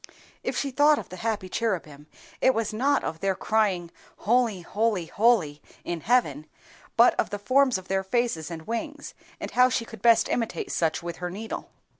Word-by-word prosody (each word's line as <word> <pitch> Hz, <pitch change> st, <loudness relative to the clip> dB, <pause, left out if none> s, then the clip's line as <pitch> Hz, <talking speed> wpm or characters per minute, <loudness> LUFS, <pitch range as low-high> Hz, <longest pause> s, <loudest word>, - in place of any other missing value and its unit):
If -, -, -3 dB
she 275 Hz, -, -1 dB
thought 290 Hz, +3 st, +4 dB
of -, -, -7 dB
the 185 Hz, -, -9 dB
happy 215 Hz, -1 st, -2 dB
cherubim, 165 Hz, -9 st, -3 dB, 0.3 s
it 260 Hz, -, +4 dB
was 225 Hz, -1 st, -1 dB
not 275 Hz, +6 st, +1 dB
of 160 Hz, -, -4 dB
their 195 Hz, +1 st, 0 dB
crying 190 Hz, -5 st, 0 dB, 0.3 s
"Holy, 230 Hz, -4 st, +1 dB
holy, 205 Hz, 0 st, -1 dB
holy!" 180 Hz, -8 st, +2 dB, 0.2 s
in 170 Hz, -2 st, -4 dB
heaven, 155 Hz, -, +1 dB, 0.5 s
but 235 Hz, +1 st, +7 dB
of -, -, +1 dB
the 205 Hz, -, -4 dB
forms 255 Hz, +4 st, +3 dB
of 185 Hz, 0 st, -11 dB
their 190 Hz, 0 st, 0 dB
faces 190 Hz, -6 st, -1 dB
and 160 Hz, -2 st, -7 dB
wings, 285 Hz, +6 st, -5 dB, 0.3 s
and -, -, -6 dB
how 250 Hz, 0 st, +5 dB
she 230 Hz, -1 st, -1 dB
could 225 Hz, -, -12 dB
best 230 Hz, -1 st, +5 dB
imitate 230 Hz, -2 st, -2 dB
such 165 Hz, 0 st, 0 dB
with 170 Hz, -1 st, -5 dB
her 180 Hz, 0 st, -4 dB
needle. 215 Hz, +5 st, -6 dB
215 Hz, 185 wpm, -26 LUFS, 175-240 Hz, 0.5 s, but